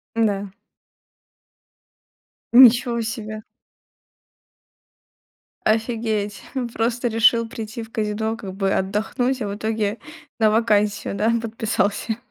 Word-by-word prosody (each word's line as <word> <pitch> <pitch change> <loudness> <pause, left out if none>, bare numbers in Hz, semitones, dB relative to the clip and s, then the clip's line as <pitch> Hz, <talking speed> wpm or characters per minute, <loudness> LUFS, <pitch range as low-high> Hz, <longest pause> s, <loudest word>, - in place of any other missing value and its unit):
Н-да. 205 -3 +1 2.1
Ничего 240 -1 +6
себе! 215 -1 -5 2.2
Офигеть, 220 -2 -1 0.3
просто 240 +2 0
решил 230 0 +3
прийти 225 0 -6
в 225 - -13
казино, 220 +1 -2
как 195 -4 -8
бы 195 0 -1
отдохнуть, 235 +7 -1
а 210 - -2
в 200 - -4
итоге 215 0 -2 0.4
на 220 -1 +5
вакансию, 210 -2 +1
да, 215 +3 +1
подписался. 220 -1 -1
220 Hz, 95 wpm, -22 LUFS, 210-230 Hz, 2.2 s, Ничего